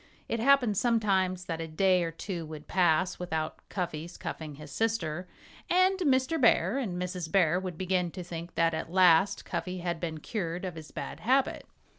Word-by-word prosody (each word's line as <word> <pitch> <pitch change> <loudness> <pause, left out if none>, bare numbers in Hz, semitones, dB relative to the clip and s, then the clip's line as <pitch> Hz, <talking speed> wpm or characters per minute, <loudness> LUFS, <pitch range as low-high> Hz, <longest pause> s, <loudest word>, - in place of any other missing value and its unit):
It 230 - -1
happened 245 -4 +4
sometimes 190 -6 +1
that 165 -2 -3
a 165 - -4
day 180 +3 +3
or 165 - -1
two 170 +1 -5
would 155 -1 -9
pass 180 0 +2
without 160 -3 -3
Cuffy's 175 -2 -4
cuffing 155 -3 -6
his 150 0 -11
sister. 185 -6 -1 0.4
And 370 +2 +4
Mr. 280 -1 +2
Bear 255 +2 +4
and 190 -9 -3
Mrs. 180 -3 -4
Bear 180 -3 +3
would 185 -3 -5
begin 185 -1 0
to 180 - -6
think 170 0 -7
that 165 -1 +3
at 160 +1 -4
last 185 0 +4
Cuffy 180 -1 -4
had 170 -1 -2
been 160 -2 -3
cured 175 -1 -3
of 180 - -4
his 160 -1 -10
bad - - -6
habit. 265 +3 +1
180 Hz, 180 wpm, -29 LUFS, 165-205 Hz, 0.4 s, happened